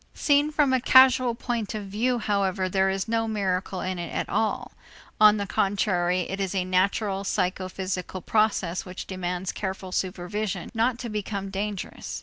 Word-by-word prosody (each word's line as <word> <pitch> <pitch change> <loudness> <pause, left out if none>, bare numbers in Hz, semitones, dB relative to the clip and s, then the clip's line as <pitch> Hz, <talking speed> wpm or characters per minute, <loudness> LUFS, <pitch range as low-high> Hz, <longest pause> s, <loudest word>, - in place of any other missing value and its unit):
Seen 290 0 +3
from 295 -3 +2
a 260 - +2
causal 260 -2 +6
point 230 -3 -3
of 210 -2 -4
view, 230 +6 0
however, 200 -3 0
there 190 +1 +2
is 190 +2 -2
no 225 0 0
miracle 190 -3 -1
in 185 -1 -3
it 170 - -5
at - - -2
all. 220 - -1 0.5
On 215 0 +7
the 200 - -2
contrary, 185 -2 +1
it 195 +3 -4
is 195 0 -2
a 185 -1 0
natural 195 +2 +1
psychophysical 185 -1 -2
process 200 -5 +1
which 185 0 -7
demands 180 0 -3
careful 190 -1 -5
supervision 185 +1 -3
not 235 +2 +1
to 245 - -5
become 200 -2 -4
dangerous. 200 0 -4
195 Hz, 160 wpm, -26 LUFS, 185-220 Hz, 0.5 s, On